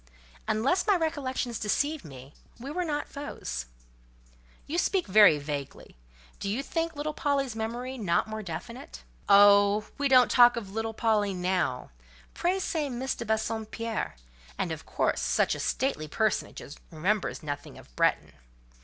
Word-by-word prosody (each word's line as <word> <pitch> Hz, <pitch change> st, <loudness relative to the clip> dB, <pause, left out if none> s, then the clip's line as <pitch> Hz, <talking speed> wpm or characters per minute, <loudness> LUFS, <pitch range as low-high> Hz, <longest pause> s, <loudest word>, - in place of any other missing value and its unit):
Unless 265 Hz, -, +1 dB
my 405 Hz, -, +5 dB
recollections 275 Hz, -8 st, -2 dB
deceive 285 Hz, +9 st, 0 dB
me, 135 Hz, -2 st, -12 dB, 0.3 s
we 270 Hz, +4 st, -6 dB
were 360 Hz, +3 st, -1 dB
not 295 Hz, -3 st, -2 dB
foes—" 65 Hz, -, -6 dB, 1.0 s
"You 330 Hz, +4 st, -1 dB
speak 380 Hz, 0 st, +1 dB
very 205 Hz, -5 st, +7 dB
vaguely. 145 Hz, -1 st, -6 dB, 0.4 s
Do 200 Hz, -, -3 dB
you 235 Hz, +7 st, -1 dB
think 330 Hz, +2 st, -2 dB
little 300 Hz, +1 st, -3 dB
Polly's 275 Hz, -5 st, -1 dB
memory, 240 Hz, +4 st, -4 dB
not 185 Hz, -3 st, +1 dB
more 220 Hz, 0 st, -5 dB
definite?" 160 Hz, -, -8 dB, 0.3 s
"Oh! 205 Hz, +1 st, +6 dB
we 285 Hz, -, +2 dB
don't 255 Hz, -2 st, +6 dB
talk 245 Hz, -1 st, +7 dB
of 205 Hz, -4 st, -5 dB
'little 225 Hz, +1 st, -3 dB
Polly' 210 Hz, -4 st, +1 dB
now. 180 Hz, -, -1 dB, 0.4 s
Pray 360 Hz, +2 st, 0 dB
say, 320 Hz, -6 st, -2 dB
Miss 260 Hz, +1 st, -2 dB
de 235 Hz, -, -6 dB
Bassompierre; 220 Hz, -, -2 dB, 0.4 s
and, 170 Hz, -, -2 dB
of 160 Hz, -1 st, -7 dB
course, -, -, 0 dB
such -, -, +2 dB
a -, -, -5 dB
stately 260 Hz, -, -1 dB
personage 215 Hz, +8 st, -1 dB, 0.3 s
remembers 180 Hz, +4 st, -1 dB
nothing 145 Hz, -1 st, -6 dB
of -, -, -16 dB
Bretton. -, -, +1 dB
220 Hz, 145 wpm, -28 LUFS, 190-275 Hz, 1.0 s, very